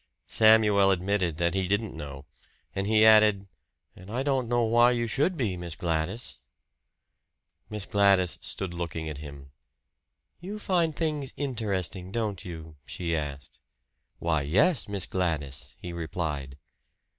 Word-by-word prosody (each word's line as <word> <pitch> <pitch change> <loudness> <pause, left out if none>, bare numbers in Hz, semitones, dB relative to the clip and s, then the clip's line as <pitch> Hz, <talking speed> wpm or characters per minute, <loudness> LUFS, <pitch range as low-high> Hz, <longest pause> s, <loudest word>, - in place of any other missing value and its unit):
Samuel 110 -3 +5
admitted 95 -3 0
that 85 0 +1
he 95 -1 0
didn't 100 +3 -1
know; 70 -1 -8 0.5
and 95 +1 -1
he 110 0 +5
added, 105 -2 +6 0.5
"And 95 +1 -13
I 125 +5 -2
don't 135 -4 0
know 120 -1 +2
why 120 +2 +5
you 120 -1 0
should 145 - 0
be, 110 -9 -1
Miss 85 -3 -6
Gladys." 85 +7 -2 1.3
Miss 105 -2 -3
Gladys 100 -3 +4
stood 95 -3 -3
looking 85 -2 -4
at 75 -2 -6
him. 70 -2 -10 0.9
"You 195 +4 -6
find 175 -6 0
things 150 -4 -2
interesting, 100 - -3
don't 105 -4 -3
you?" 80 -3 -9
she 85 -2 -3
asked. 70 -4 -6 0.6
"Why, 80 -3 0
yes, 100 - +2
Miss 100 -3 -1
Gladys," 80 -7 -3
he 90 -1 -7
replied. 80 -5 -4
95 Hz, 135 wpm, -27 LUFS, 80-110 Hz, 1.3 s, added